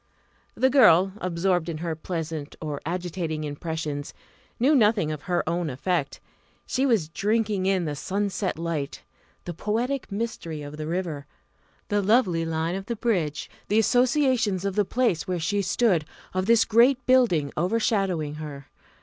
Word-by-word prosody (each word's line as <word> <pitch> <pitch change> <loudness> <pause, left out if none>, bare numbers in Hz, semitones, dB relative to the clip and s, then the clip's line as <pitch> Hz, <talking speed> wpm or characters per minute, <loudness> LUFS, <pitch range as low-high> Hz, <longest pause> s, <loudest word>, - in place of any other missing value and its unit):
The 260 0 +3
girl, 195 -8 +6
absorbed 175 -1 0
in 160 - -3
her 165 0 -3
pleasant 160 -2 -5
or 150 -3 -4
agitating 170 -3 -3
impressions, 150 -1 -4 0.4
knew 265 +6 +4
nothing 210 - +3
of 150 -2 -5
her 175 0 -1
own 170 -1 -1
effect. 145 +3 -2 0.5
She 265 +2 0
was 220 - +2
drinking 205 +2 0
in 190 -3 +1
the 150 -2 -3
sunset 195 +3 -2
light 160 -4 -4 0.4
the 175 - -4
poetic 235 - -2
mystery 195 -8 -4
of 145 +1 -8
the 155 0 -5
river 165 -5 -3 0.6
the 205 -1 +2
lovely 190 -6 +2
line 165 +1 -1
of 195 +1 -5
the 235 - -2
bridge 180 - -1 0.2
the 210 - +1
associations 245 -4 +2
of 195 -1 -1
the 210 -1 +2
place 230 -7 0
where 180 -1 -1
she 200 +5 0
stood, 190 -5 +2 0.3
of 185 +1 -1
this 230 -1 +5
great 245 +3 +4
building 220 - +3
overshadowing 185 -4 0
her. 140 -3 -8
180 Hz, 150 wpm, -25 LUFS, 160-220 Hz, 0.6 s, girl